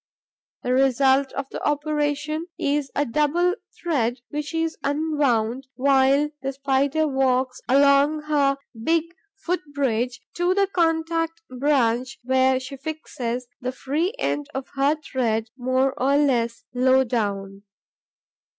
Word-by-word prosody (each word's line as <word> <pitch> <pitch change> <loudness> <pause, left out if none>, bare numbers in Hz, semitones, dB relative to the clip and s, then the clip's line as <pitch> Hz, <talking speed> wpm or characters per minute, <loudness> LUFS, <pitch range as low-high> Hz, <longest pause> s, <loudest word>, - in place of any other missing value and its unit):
The 250 - 0
result 270 +1 +3
of - - -3
the - - -6
operation 295 +1 -1
is 285 -1 0
a 290 - +2
double 300 +8 +2 0.3
thread 255 -8 0
which 295 0 -4
is 325 0 -1
unwound 275 -5 0
while 275 +2 +3
the 270 0 -3
Spider 280 +3 +1
walks 260 -2 +1
along 280 +3 +4
her 285 -2 +2 0.3
big 325 +4 +3 0.3
foot 365 -2 -2
bridge 250 -3 0 0.2
to 355 +1 +2
the 400 0 +4
contact 330 -2 0
branch, 255 -2 +1
where 260 +1 +3
she 265 +1 -8
fixes 255 -4 -4
the 255 -1 -3
free 310 - -2
end 290 - -1
of 265 0 -4
her 280 +2 +2
thread 235 -7 -2
more 260 +1 +1
or 275 +2 +3
less 240 -5 +1
low 260 +1 +4
down. 200 -5 -2
275 Hz, 125 wpm, -23 LUFS, 255-300 Hz, 0.3 s, along